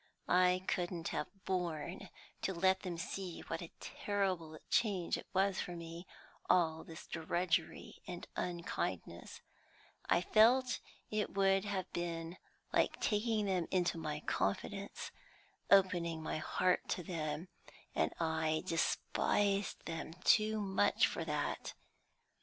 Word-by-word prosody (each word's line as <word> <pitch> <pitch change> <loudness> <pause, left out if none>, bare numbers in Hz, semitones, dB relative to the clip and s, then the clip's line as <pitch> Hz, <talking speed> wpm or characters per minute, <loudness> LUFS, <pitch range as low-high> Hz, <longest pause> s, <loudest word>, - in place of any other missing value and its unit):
I 180 0 +4
couldn't 175 -3 -1
have 150 -1 -2 0.2
borne 175 0 -2 0.3
to 190 - -1
let 190 +2 +4
them 180 -3 -4
see 180 0 -4
what 165 - -4
a 170 - -6
terrible 185 -6 -2
change 200 -7 +2
it - - -7
was 195 0 +2
for 175 - -5
me, 170 +1 -8 0.4
all 160 -3 +3
this 165 -1 -10
drudgery 170 +1 -1
and 175 -1 -6
unkindness; 95 - -3 0.7
I 170 - +5
felt 240 +6 +5 0.3
it 215 -2 -1
would 195 0 +4
have 195 -3 -3
been 170 0 -3 0.4
like - - +2
taking 215 0 +1
them 185 -4 +1
into 175 -3 +1
my 150 -2 -3
confidence, 195 - -2 0.6
opening 175 -4 +4
my 155 - -2
heart 180 +3 +1
to 180 - -1
them, 160 0 -3 0.4
and - - +2
I 160 -1 +1
despised 195 +3 +1
them 165 -1 -4
too 215 0 +4
much 190 - +3
for - - -2
that. - - -2
180 Hz, 125 wpm, -36 LUFS, 165-195 Hz, 0.7 s, I